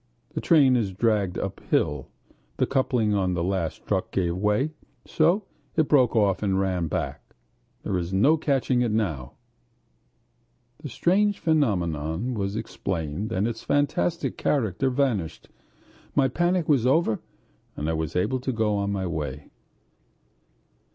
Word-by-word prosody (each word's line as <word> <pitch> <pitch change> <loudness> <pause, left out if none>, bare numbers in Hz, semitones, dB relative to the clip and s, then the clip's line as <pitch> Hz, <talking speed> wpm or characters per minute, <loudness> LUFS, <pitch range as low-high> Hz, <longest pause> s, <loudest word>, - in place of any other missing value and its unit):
the - - -3
train 140 -6 +5
is 110 -6 0
dragged 105 -3 +1
uphill. 75 -2 -1 0.5
The - - +2
coupling 125 -5 +1
on 95 -3 +1
the 85 - -1
last 95 -3 -2
truck - - -1
gave 85 -3 0
way, 105 +10 +1 0.3
so 175 +6 +2 0.3
it 155 -2 +2
broke 130 -5 +4
off 100 -3 +2
and 95 -2 +1
ran 90 -3 0
back.... - - -4 0.5
There 100 - -2
is 90 0 -2
no 110 +12 +4
catching 135 -5 +1
it 120 - +1
now!..." 80 - -2 1.5
The 145 - -7
strange 200 - +2
phenomenon 95 - 0
was 100 -2 -2
explained 95 -1 -3
and 105 0 +1
its 115 -1 -4
fantastic 155 +4 0
character 130 -2 +1
vanished. 125 - -1 0.7
My 140 -2 +4
panic 175 +5 0
was 135 -5 +3
over 135 -5 +2 0.6
and 75 - -3
I 80 - 0
was 80 -2 -3
able 130 +9 +1
to 130 +1 -2
go 110 -3 0
on 100 0 -1
my 95 -2 -2
way. 75 -5 -5
105 Hz, 140 wpm, -25 LUFS, 90-135 Hz, 1.5 s, train